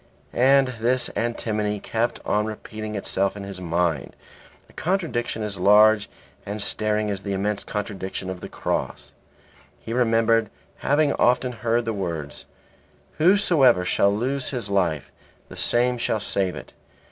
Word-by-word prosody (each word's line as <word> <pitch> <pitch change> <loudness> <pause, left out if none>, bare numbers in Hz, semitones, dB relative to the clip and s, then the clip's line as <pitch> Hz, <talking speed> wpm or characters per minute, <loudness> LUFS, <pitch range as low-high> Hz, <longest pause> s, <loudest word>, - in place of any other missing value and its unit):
And 135 +1 +4
this 120 +1 +1
antinomy 105 -3 -1
kept 115 +4 -2
on 105 +1 +1
repeating 110 0 -6
itself 100 0 -1
in 100 - -6
his 100 -2 -7
mind, 85 -4 -1 0.5
a - - -21
contradiction 160 - -2
as 100 -2 -4
large 105 +2 +5 0.3
and 105 +2 -5
staring 105 0 0
as 95 -1 -4
the 100 0 -3
immense 100 +1 -1
contradiction 95 -3 -4
of 95 -1 -5
the - - -8
Cross; - - -3 0.7
he 115 - -6
remembered 115 -2 +2 0.3
having 145 0 +2
often 125 +1 +2
heard 115 0 -1
the 115 - -1
words, 85 -7 -5 0.7
"Whosoever 155 - +4
shall 100 +2 +3
lose 130 +6 -1
his 120 -7 -4
life 85 -8 0 0.4
the - - -10
same 125 +1 +1
shall 110 -1 0
save 95 -3 -1
it." - - -10
110 Hz, 140 wpm, -24 LUFS, 100-120 Hz, 0.7 s, large